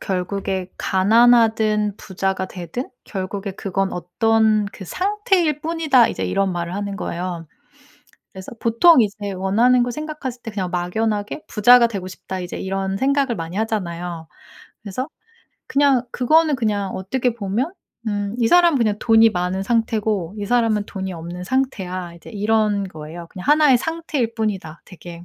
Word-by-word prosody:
결국에 190 0 -3
가난하든 220 0 +3
부자가 190 -1 -2
되든 185 - -6
결국에 195 0 -5
그건 195 0 -2
어떤 215 +4 +2
그 195 - -9
상태일 370 - 0
뿐이다." 310 -7 +3
이제 - - -3
이런 195 -1 0
말을 175 0 -4
하는 200 0 -4
거예요. 175 -3 -4 0.9
그래서 190 0 -9
보통 245 +6 +5
이제 205 -1 -2
원하는 225 +7 +3
걸 245 - -2
생각했을 295 -4 -6
때 225 - -6
'그냥 190 -3 -3
막연하게 205 - -2
부자가 235 +2 +6
되고 195 -5 -5
싶다.' 185 0 -7
이제 180 -1 -6
이런 195 0 -2
생각을 275 0 +1
많이 165 0 -6
하잖아요. 175 -6 -3 0.5
그래서 220 +6 -4 0.6
그냥 275 -3 +3
그거는 310 +3 +3
그냥 205 -5 -1
어떻게 240 +6 -1
보면 230 - -2 0.3
음 205 0 -2
"이 235 - +2
사람은 345 -1 +5
그냥 215 -4 +1
돈이 225 -1 +5
많은 180 +1 -2
상태고 215 -5 0
이 205 - -3
사람은 225 -3 +2
돈이 190 -1 -5
없는 170 +2 -7
상태야." 185 -8 -2
이제 170 - -14
이런 210 -1 +1
거예요. 165 0 -9
"그냥 185 - -9
1 300 0 +5
의 250 - +6
상태일 305 -6 -2
뿐이다 195 -8 -3
되게" 175 -1 -11
210 Hz, 325 characters per minute, -21 LUFS, 185-245 Hz, 0.9 s, 부자가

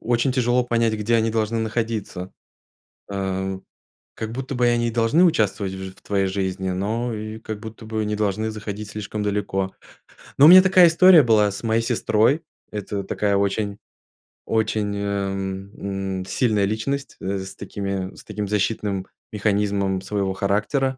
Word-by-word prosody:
очень 120 +2 +1
тяжело 125 -1 +2
понять, 115 -2 +1
где 110 +2 0
они 110 0 +1
должны 110 0 0
находиться. 110 -4 -3 0.8
А. 95 -1 -2 0.6
Как 110 0 -5
будто 135 +3 -5
бы, 120 -1 +2
они 120 -1 +1
должны 115 +10 +3
участвовать 105 - +1
в 95 0 -6
ж 95 - -6
в - - -22
твоей 100 -1 0
жизни, 95 -1 -2
но 110 +6 -2
и, 110 +1 -6
как 110 -2 -6
будто 110 0 -10
бы, 110 -1 -2
не 105 0 -1
должны 110 +1 -1
заходить 105 -1 -6
слишком 105 0 -4
далеко. 100 -2 -1 0.6
Ну 140 - +8
у - - +10
меня 185 +2 +11
такая 185 -2 +6
история 170 -1 +7
была 110 -3 +4
с 100 - -7
моей 115 0 +2
сестрой. 115 +5 +2 0.3
Это 105 -1 -4
такая 100 +1 0
очень 100 +1 -1 0.7
очень, 110 -2 0
а, 100 -1 -1
м, 95 0 -4
м, 95 - -5
сильная 105 0 +1
личность, 135 +7 -3
э, 95 +1 -2
с 95 0 -7
такими, 100 -1 -4
с - - -12
таким 105 -1 -4
защитным 100 -1 -1 0.2
механизмом 100 -2 0
своего 95 -1 -1
характера. 105 +8 0
105 Hz, 160 wpm, -23 LUFS, 100-115 Hz, 0.8 s, меня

